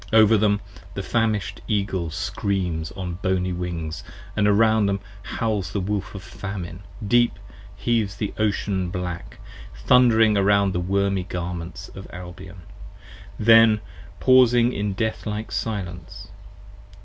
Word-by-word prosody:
15 110 - +5
Over 110 +1 +6
them 105 -1 +2 0.3
the 100 - -3
famish'd 110 -3 -1
Eagle 100 -5 -1
screams 90 -2 -2
on 90 -2 -5
boney 95 -1 0
Wings, 85 -3 -4 0.3
and 105 - +2
around 110 0 +4
Them 100 0 0 0.2
howls 105 -5 -2
the 100 - -1
Wolf 100 +1 -3
of 95 - -7
famine, 95 -3 -7 0.3
deep 120 +2 +4 0.4
heaves 110 -5 0
the 105 - -3
Ocean 100 -3 0
black, 90 -8 -5 0.5
thundering 115 -4 +5
Around 100 -1 +3
the 90 - 0
wormy 100 +1 0
Garments 90 +1 -5
of 95 -1 -10
Albion: 90 +1 -10 0.7
then 115 -1 +6 0.4
pausing 125 -2 +5
in 100 -1 -2
deathlike 110 -1 -3
silence. 95 -5 -5
100 Hz, 125 wpm, -23 LUFS, 90-110 Hz, 0.7 s, Over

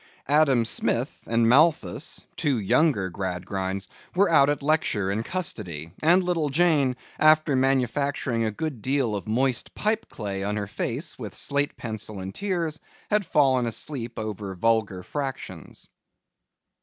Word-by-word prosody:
Adam 140 -5 +4
Smith 110 - 0
and 115 0 +2
Malthus, 140 - +2
two 140 -4 +1
younger 105 - +2
Gradgrinds, 95 +1 -3 0.3
were 195 -1 +3
out 140 -3 +6
at 145 -1 -1
lecture 140 -11 +1
in 105 +3 -1
custody; 100 - -3
and 175 +4 +5
little 170 -4 0
Jane, 145 -4 +3 0.2
after 155 -2 +5
manufacturing 130 -1 +1
a 110 - +1
good 135 +2 -4
deal 130 -3 0
of 100 - -5
moist 125 +3 0
pipe 215 +1 -1
clay 100 -3 -4
on 105 +1 -1
her 105 - -2
face 120 - -4
with 105 -5 -7
slate 140 +1 0
pencil 110 -3 -4
and 95 +1 -6
tears, 170 -6 -2 0.3
had 210 -3 +2
fallen 130 -6 +3
asleep 120 0 -4
over 105 -3 -5
vulgar 100 -2 +1
fractions. 135 - -6
125 Hz, 140 wpm, -25 LUFS, 105-150 Hz, 0.3 s, out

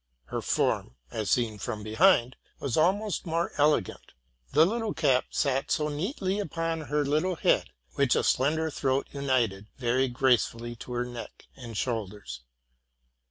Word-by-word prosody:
Her - - -2
form, - - 0 0.2
as 110 -3 -3
seen 110 -4 +1
from 105 0 -4
behind, 125 - +4 0.2
was 135 -4 -2
almost 195 +4 +1
more 165 +1 0
elegant. 150 +1 +1 0.4
The 155 - +6
little 225 +2 -1
cap 135 -5 +3
sat 135 -1 0
so 150 0 +1
neatly 190 - -2
upon 165 -3 -2
her 150 0 -1
little 155 +6 +1
head, - - +2 0.2
which 140 -3 +2
a - - +2
slender 155 +4 +1
throat 135 -1 0
united 120 -8 0
very 130 +1 +1
gracefully 120 -2 +1
to 125 - -8
her 120 0 -1
neck 120 -1 -9
and 120 -5 -8
shoulders. 105 - -4
135 Hz, 145 wpm, -28 LUFS, 120-160 Hz, 0.4 s, The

